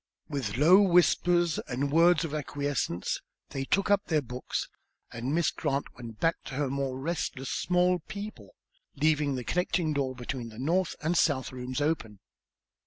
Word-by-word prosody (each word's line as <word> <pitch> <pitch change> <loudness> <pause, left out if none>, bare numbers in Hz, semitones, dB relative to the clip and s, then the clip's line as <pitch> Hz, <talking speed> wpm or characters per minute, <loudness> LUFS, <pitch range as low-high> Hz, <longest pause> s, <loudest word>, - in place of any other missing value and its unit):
With 130 -9 -3
low 175 +8 +7
whispers 175 -2 +3
and 140 +2 -2
words 165 +1 +5
of 155 - -6
acquiescence, 145 - -2 0.3
they 135 -1 -3
took 195 +7 +1
up 205 0 +3
their 155 -3 +1
books, 125 +1 -4 0.5
and 120 +3 -3
Miss 165 0 +2
Grant 140 +1 -2
went 115 -3 -10
back 165 0 +2
to 135 - -6
her 140 -1 -1
more 135 -1 -2
restless 135 -2 -3
small 180 0 +2
people, 200 - -8 0.4
leaving 150 -1 +2
the 125 - -4
connecting 175 0 0
door 135 -2 -1
between 120 -1 -5
the 110 - -13
north 170 +7 0
and 165 +3 +1
south 145 -6 +2
rooms 130 +2 -4
open. 130 -10 -1
145 Hz, 160 wpm, -29 LUFS, 130-170 Hz, 0.5 s, low